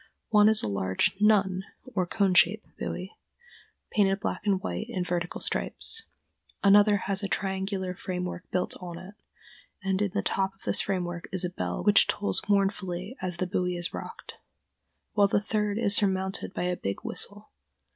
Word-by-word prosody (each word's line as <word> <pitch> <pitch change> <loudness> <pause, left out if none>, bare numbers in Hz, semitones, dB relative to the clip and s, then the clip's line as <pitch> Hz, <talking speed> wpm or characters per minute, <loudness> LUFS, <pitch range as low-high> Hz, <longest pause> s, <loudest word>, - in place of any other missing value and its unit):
One 210 -1 +6
is 220 -1 +5
a - - -1
large 95 - 0
"nun," 195 -3 +3 0.3
or 185 -4 0
cone 195 0 +1
shaped, 180 +5 +4
buoy, 185 +3 -4 0.8
painted 195 -2 +2
black 210 - -4
and 195 -2 +3
white 215 +3 -4
in 190 -7 -2
vertical 175 0 -3
stripes; 450 0 -1 0.6
another 205 +1 +6
has 195 0 +2
a 200 - -2
triangular 190 -1 -2
framework 180 -1 -5
built 180 - -1
on 175 -2 -7
it, 185 +3 -10 0.7
and 190 0 0
in 205 - +1
the 205 - 0
top 195 0 -1
of 195 - -21
this - - +4
framework 175 -3 -3
is 185 -1 -1
a 180 - -3
bell 180 - -3
which 205 -1 +6
tolls 205 - +1
mournfully 195 +1 0
as 180 -2 -3
the 185 - -1
buoy 180 0 -1
is 175 0 -2
rocked; - - -8 0.7
while 205 -2 +4
the 200 - +2
third 210 0 -1
is 205 -3 +3
surmounted 190 -1 +2
by - - -3
a 180 0 0
big 100 - -4
whistle.... - - -2
190 Hz, 170 wpm, -27 LUFS, 180-205 Hz, 0.8 s, One